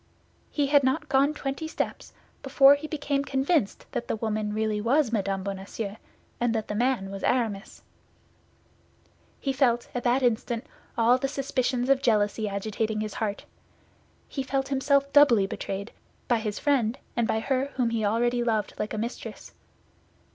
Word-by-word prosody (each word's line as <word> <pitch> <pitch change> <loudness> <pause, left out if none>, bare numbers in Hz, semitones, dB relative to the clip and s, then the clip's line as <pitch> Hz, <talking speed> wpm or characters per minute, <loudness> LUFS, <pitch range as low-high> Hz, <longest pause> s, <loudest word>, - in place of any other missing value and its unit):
He 290 - 0
had 285 0 +4
not 260 +1 0
gone 275 +2 +4
twenty 285 +1 -4
steps - - -4 0.3
before 275 0 +6
he 285 +2 -3
became 285 -2 -1
convinced 275 - 0
that - - -3
the - - -1
woman 215 -1 -2
was 210 - -3
really 215 -1 0
Mme. 225 -7 +1
Bonacieux 200 +2 -5 0.4
and 240 -1 +1
that 220 -1 -2
the - - -2
man 230 -3 0
was 195 0 -6
Aramis. 220 -5 -1 1.6
He 275 - -1
felt 245 -3 +1
at 245 - -3
that 255 +2 +2
instant 235 -1 0 0.3
all 240 +2 +4
the 270 - 0
suspicions 255 -2 -1
of 275 0 +3
jealousy 215 -3 +1
agitating 215 +2 -2
his 215 -1 -4
heart. 205 -2 -3 0.8
He 275 - -4
felt 270 0 -2
himself 280 0 +1
doubly 250 -9 +6
betrayed, 195 +2 -5 0.4
by 240 -2 +2
his 210 -2 -3
friend 260 -4 +1 0.2
and 235 -2 +1
by 220 - +1
her 265 +3 0
whom 245 -3 +1
he 225 -1 -1
already 240 +3 +1
loved 220 -3 0
like 215 - -2
a - - -4
mistress. 230 +3 -6
240 Hz, 160 wpm, -27 LUFS, 215-270 Hz, 1.6 s, before